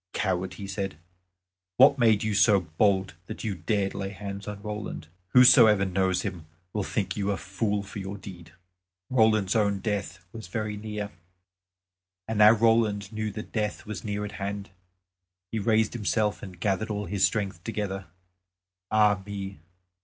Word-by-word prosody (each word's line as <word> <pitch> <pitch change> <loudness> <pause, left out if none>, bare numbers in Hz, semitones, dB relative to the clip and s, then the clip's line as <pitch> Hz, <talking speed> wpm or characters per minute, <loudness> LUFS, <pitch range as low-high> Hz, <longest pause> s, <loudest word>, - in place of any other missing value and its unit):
"Coward," 95 -2 -1
he 100 - -7
said, 95 -4 -4 0.8
"what 135 +2 +7
made 110 -4 +4
you 110 -1 0
so 100 -1 +5
bold 95 +4 +1
that 110 - -7
you 110 -3 -1
dared 95 +3 -1
lay 95 -1 -4
hands 100 +1 -7
on 105 -1 -5
Roland? 105 -7 -6 0.2
Whosoever 115 -5 +7
knows 95 -1 0
him 85 -4 -5 0.3
will 105 - -1
think 100 +1 -2
you 100 -1 -1
a 100 - 0
fool 100 +1 -2
for 100 +1 -8
your 95 +1 -5
deed." 95 -3 -10 0.7
[Illustration: - - -3
ROLAND'S 110 -4 +3
OWN 100 -2 +2
DEATH 95 -3 -3
WAS 110 -1 -8
VERY 110 -2 -3
NEAR] 105 -1 -5 1.2
And 110 -1 -2
now 105 0 +9
Roland 110 -2 +2
knew 110 0 -2
that 105 +2 -7
death 105 -1 -2
was 105 -3 -6
near 105 -1 -3
at 105 - -6
hand. 100 0 -4 0.8
He 115 - -1
raised 110 0 +2
himself 105 -1 0
and 90 -3 -10
gathered 105 +3 0
all 105 -1 -2
his 100 -1 -1
strength 95 -5 0
together 100 -4 -4 0.8
ah 105 -2 +3
me! 100 -2 -6
105 Hz, 160 wpm, -27 LUFS, 95-110 Hz, 1.2 s, now